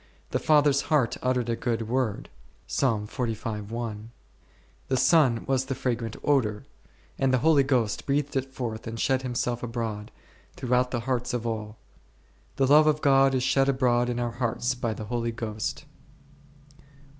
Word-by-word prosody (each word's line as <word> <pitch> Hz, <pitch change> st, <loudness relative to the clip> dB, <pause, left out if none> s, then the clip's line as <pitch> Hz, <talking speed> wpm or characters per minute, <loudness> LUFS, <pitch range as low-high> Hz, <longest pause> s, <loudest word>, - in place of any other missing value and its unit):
The -, -, 0 dB
Father's 145 Hz, -2 st, +4 dB
heart 145 Hz, -7 st, +2 dB
uttered 125 Hz, -2 st, 0 dB
a 115 Hz, -, 0 dB
good 115 Hz, -2 st, -2 dB
Word 120 Hz, -3 st, -1 dB, 0.5 s
1, 110 Hz, -6 st, +1 dB
the 110 Hz, -2 st, -4 dB, 0.9 s
Son 130 Hz, -3 st, +3 dB
was 130 Hz, -1 st, 0 dB
the 135 Hz, 0 st, -3 dB
fragrant 115 Hz, -4 st, -2 dB
odour, 110 Hz, -8 st, +1 dB, 0.5 s
and 135 Hz, -1 st, +2 dB
the 130 Hz, -, +4 dB
Holy 150 Hz, +2 st, +4 dB
Ghost 125 Hz, -6 st, 0 dB
breathed 145 Hz, +1 st, 0 dB
it 135 Hz, 0 st, -2 dB
forth 115 Hz, -4 st, -5 dB
and 115 Hz, 0 st, -5 dB
shed 130 Hz, -2 st, +1 dB
Himself 120 Hz, -1 st, -2 dB
abroad, 115 Hz, -3 st, -4 dB, 0.5 s
throughout 125 Hz, -1 st, +1 dB
the 120 Hz, -2 st, -2 dB
hearts 125 Hz, 0 st, -1 dB
of 120 Hz, -1 st, -3 dB
all; 110 Hz, -1 st, -4 dB, 0.8 s
The 135 Hz, -, +2 dB
love 150 Hz, +3 st, +6 dB
of 150 Hz, 0 st, +2 dB
God 135 Hz, -1 st, +4 dB
is 130 Hz, -, 0 dB
shed 135 Hz, +1 st, +2 dB
abroad 125 Hz, -2 st, +2 dB
in 120 Hz, 0 st, -2 dB
our 120 Hz, -1 st, -1 dB
hearts 120 Hz, +1 st, -1 dB
by 120 Hz, -3 st, -3 dB
the 110 Hz, -, -6 dB
Holy 115 Hz, +1 st, -2 dB
Ghost 115 Hz, +6 st, -4 dB, 0.9 s
u. -, -, -22 dB
125 Hz, 155 wpm, -26 LUFS, 115-135 Hz, 0.9 s, love